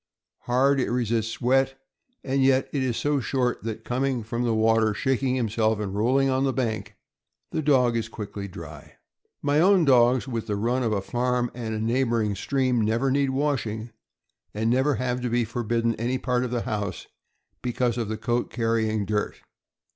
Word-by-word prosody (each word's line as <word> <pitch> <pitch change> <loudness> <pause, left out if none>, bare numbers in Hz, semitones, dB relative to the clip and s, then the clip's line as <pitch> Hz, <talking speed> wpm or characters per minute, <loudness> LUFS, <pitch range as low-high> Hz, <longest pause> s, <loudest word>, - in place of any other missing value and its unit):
Hard, 135 +3 +3
it 130 - 0
resists 115 -2 -1
wet, 135 +2 +2 0.4
and 135 0 +1
yet 130 0 +3
is 130 -5 0
so 145 -1 +1
short 125 -1 -1
that, 110 0 -6
coming 130 -1 -1
from 115 +2 -3
the 120 -2 +1
water, 110 -1 +3
shaking 130 +1 0
himself, 110 -2 +1
and 100 -3 -3
rolling 130 +6 +2
on 130 0 +1
the 135 - +2
bank, 110 -6 -3 0.6
the 155 - -1
dog 130 -5 +3
is 115 -1 -2
quickly 100 -2 -6
dry. 80 -5 -10 0.5
My 145 +1 +2
own 185 0 +5
dogs, 125 -1 +4
with 115 -4 -4
the 105 - -1
run 120 +5 0
of 115 -3 0
a 100 -2 -1
farm 125 +1 0
and 110 -2 -3
neighboring 115 -3 +1
stream, 130 +4 0
never 115 +5 +1
need 140 0 +2
washing, 125 -5 -1 0.6
and 110 +2 +1
never 130 +3 +2
have 125 +1 -2
to 125 - -1
be 120 0 +1
forbidden 115 0 -1
any 120 +3 -1
part 125 -1 0
of 125 - -2
the 120 -1 -1
house 100 -4 -3 0.6
because 120 -1 0
of 115 -3 -2
the 110 - -3
coat 120 +2 -1
carrying 110 -3 0
dirt. 105 +1 -1
120 Hz, 175 wpm, -25 LUFS, 110-130 Hz, 0.6 s, own